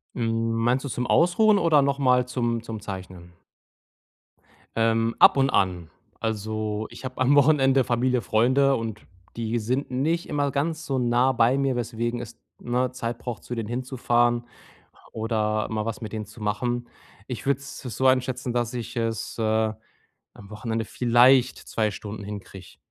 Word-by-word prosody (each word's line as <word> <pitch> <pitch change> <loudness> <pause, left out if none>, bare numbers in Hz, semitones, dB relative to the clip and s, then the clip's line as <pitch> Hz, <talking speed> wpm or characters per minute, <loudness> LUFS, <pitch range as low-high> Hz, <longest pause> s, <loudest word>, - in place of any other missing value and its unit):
Hm, 115 -1 0
meinst 120 +4 +1
du 140 - -4
zum 125 0 -3
Ausruhen 205 +5 +4
oder 165 -5 +4
nochmal 130 -3 +2
zum 120 -2 -1
zum 115 -2 -6
Zeichnen? 95 -3 -8 1.4
Ähm, 115 0 +1
ab - - +8
und 135 0 +3
an. 90 -7 0 0.3
Also, 110 -1 -2
ich - - -11
habe 130 -1 -6
am 130 +3 +4
Wochenende 135 -2 +4
Familie, 125 +1 +1
Freunde 130 +8 +3
und 110 -3 -4 0.3
die 115 0 -2
sind 130 +5 -2
nicht 160 +7 0
immer 145 -1 0
ganz 160 +4 -2
so 135 -2 -1
nah 125 +1 +3
bei 120 +3 +3
mir, 135 -2 +1
weswegen 120 0 -2
es, 120 -1 -10 0.2
ne, 125 +1 -1
Zeit 120 -2 -4
braucht, 120 -1 -6
zu 120 - -5
denen 115 -2 -4
hinzufahren 120 -1 0 0.7
oder 110 -1 -1
mal 110 -1 -2
was 115 +2 -4
mit 110 -2 -7
denen 110 -1 -4
zu 110 +3 -14
machen. 120 +3 -2 0.4
Ich 125 0 -6
würde 140 -1 +1
es 140 - -9
so 130 +1 -2
einschätzen, 130 -1 +1
dass 120 0 -1
ich 120 0 -6
es, 115 0 -3
äh, - - -1 0.9
am 100 -1 -14
Wochenende 110 +1 -3
vielleicht 125 +2 +4
2 110 -2 -1
Stunden 100 0 -7
hinkriege. 100 -3 -9
120 Hz, 160 wpm, -25 LUFS, 110-130 Hz, 1.4 s, ab